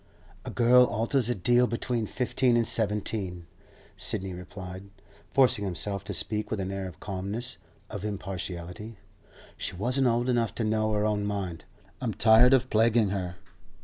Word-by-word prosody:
'A - - -4
girl 125 +1 +5
alters 120 +2 0
a 120 - +1
deal 120 +6 +3
between 115 0 -2
fifteen 125 0 +1
and 115 - +2
seventeen,' 105 -5 -1 0.5
Sidney 95 0 -2
replied, 90 +1 -9 0.4
forcing 125 -5 +4
himself 100 +1 -2
to - - -4
speak 105 -1 0
with 110 - -2
an 95 0 -3
air 95 -1 -4
of 90 - -11
calmness, 100 +6 -4 0.3
of 105 - -7
impartiality. 95 +1 -5 0.6
'She - - -3
wasn't 125 +7 +1
old 120 +1 +1
enough 120 -3 0
to 115 - -1
know 110 0 +1
her 105 0 +1
own 105 -1 0
mind. 100 -5 -4 0.4
I'm 115 -6 -2
tired 115 +4 +6
of 130 0 -1
plaguing 110 -1 +3
her. 90 -3 -3
105 Hz, 155 wpm, -28 LUFS, 95-120 Hz, 0.6 s, tired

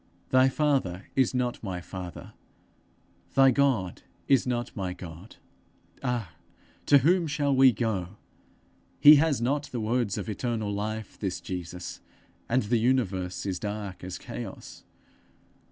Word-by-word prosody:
Thy 130 0 +5
father 130 -11 0
is 130 -1 +2
not 125 -1 -1
my 95 -4 -4
father; 90 0 -8 1.0
thy 135 -1 +7
God 125 -9 +1 0.3
is 135 -2 +3
not 120 -1 -2
my 95 -3 -3
God! 90 +2 -11 0.7
Ah, 120 -8 -2 0.6
to 145 - +8
whom 170 +5 +3
shall 145 -2 +1
we 130 0 +7
go? 105 -4 -2 0.8
He 150 +1 +10
has 150 -3 +2
not 145 +4 0
the 125 - -5
words 110 -2 0
of - - -4
eternal 110 -1 -2
life, 110 +1 -4
this 95 -3 -2
Jesus, 90 0 -6 0.5
and 125 +2 +2
the 115 +3 +1
universe 100 -8 0
is 95 -3 -2
dark 105 -2 -5
as 90 -1 -5
chaos! - - -8
110 Hz, 135 wpm, -27 LUFS, 95-130 Hz, 1.0 s, He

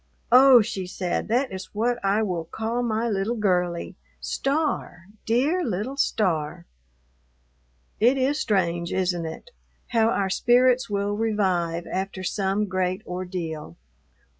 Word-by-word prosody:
"Oh," 255 -1 +8
she 195 -4 -4
said, 180 -1 -2
"that 250 +4 +1
is 190 +1 -8
what 240 +2 0
I 200 +3 +2
will 175 -5 -2
call 225 +7 -3
my 230 -1 0
little 210 +2 -1
girlie, 180 -5 0 0.2
Star, 275 - -2 0.2
dear 280 +11 +2
little 225 - -3
Star." 165 - 0 1.3
It 245 +5 +4
is 270 +3 +1
strange, 175 -4 0
isn't 175 -3 -1
it? 330 - -9 0.4
how 225 -2 +3
our 195 -4 0
spirits 245 +2 +3
will 205 0 -1
revive 185 -6 0
after 190 0 -4
some 195 +2 0
great 185 +1 -2
ordeal. 180 - -5
200 Hz, 125 wpm, -25 LUFS, 180-240 Hz, 1.3 s, Oh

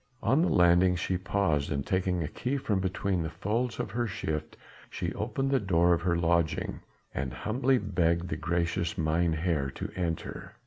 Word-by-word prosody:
On 130 +8 +3
the 175 - +2
landing 90 +1 +5
she 90 +1 -1
paused 95 -6 0
and 70 -2 -1
taking 90 -2 0
a - - -2
key 125 - -2
from 110 -7 0
between 95 0 -1
the 80 - -2
folds 115 +8 -2
of 100 - -3
her 120 +2 -1
shift 80 -4 -4 0.3
she - - -3
opened 135 +6 -2
the 135 - +4
door 85 -4 +3
of 85 - 0
her 85 0 +1
lodging 85 -1 +1 0.3
and 65 -1 -2
humbly 125 - +1
begged 90 -4 0
the - - -1
gracious 85 +1 -1
mynheer 80 -2 +1
to - - -5
enter. 85 -3 -4
90 Hz, 175 wpm, -29 LUFS, 80-100 Hz, 0.3 s, landing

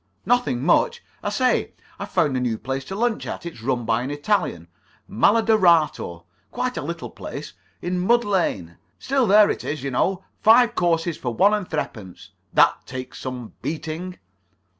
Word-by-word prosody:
"Nothing 240 - +1
much. 475 - +2 0.2
I - - -2
say, 255 -1 +1 0.3
I've - - -5
found 140 -3 +1
a - - +1
new 120 -3 -1
place 135 +3 -4
to 190 - -6
lunch 230 +1 -1
at. - - -6
It's 165 -9 -8
run 120 -1 -1
by 115 +1 +1
an 130 - -4
Italian, 145 - -1 0.4
Malodorato. 170 - +3 0.3
Quite - - -2
a - - -3
little - - -5
place, - - -8 0.3
in 180 +1 -1
Mud 235 +6 +3
Lane. 100 - -1 0.2
Still 265 -3 +1
there 205 +1 +6
it - - -5
is, 145 -3 -4
you 140 - -3
know. 185 +9 0 0.2
Five 235 +2 +6
courses 170 -3 0
for 125 -3 -4
one 200 - +4
and 205 -4 -2
threepence. 110 - -6 0.2
That - - +4
takes 130 0 -7
some 125 -3 -6
beating." 165 +3 -5
165 Hz, 165 wpm, -23 LUFS, 125-210 Hz, 0.4 s, there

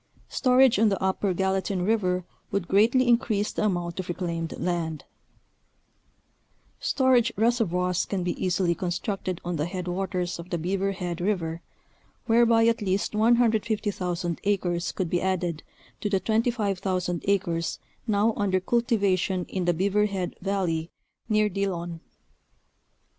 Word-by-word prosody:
Storage 255 -4 +4
on 220 0 +5
the 195 - -1
Upper 190 +1 0
Gallatin 190 0 0
River 185 -4 +1 0.2
would 200 -3 -2
greatly 235 +7 +4
increase 220 -3 +2
the - - -1
amount 175 -3 -1
of 185 - -5
reclaimed 170 -2 -3
land. 165 -4 -2 1.8
Storage 255 -3 +3
reservoirs 180 -6 +1
can 190 -3 -2
be 175 - 0
easily 180 -1 +2
constructed 185 +1 -3
on 175 -1 -2
the 150 +2 -1
headwaters 180 -1 -3
of 170 +1 -9
the 175 - -1
Beaver 195 +4 -1
Head 175 -2 -4
River, 170 -4 -1 0.6
whereby 230 -1 +4
at 230 0 +2
least 195 +1 0
150,000 210 -6 +1
acres 180 -4 0
could 185 - -2
be 175 - +1
added 180 -4 -1 0.4
to 210 - -2
the 195 -2 +2
25,000 195 -5 0
acres 170 -4 0 0.3
now 215 +1 +2
under 195 -2 +1
cultivation 195 -4 +1
in 185 -2 -3
the 175 - +3
Beaver 200 +4 +2
Head 190 -3 -3
Valley 180 -4 -1 0.4
near 215 -1 +3
Dillon. 175 -4 -3
190 Hz, 130 wpm, -26 LUFS, 175-210 Hz, 1.8 s, on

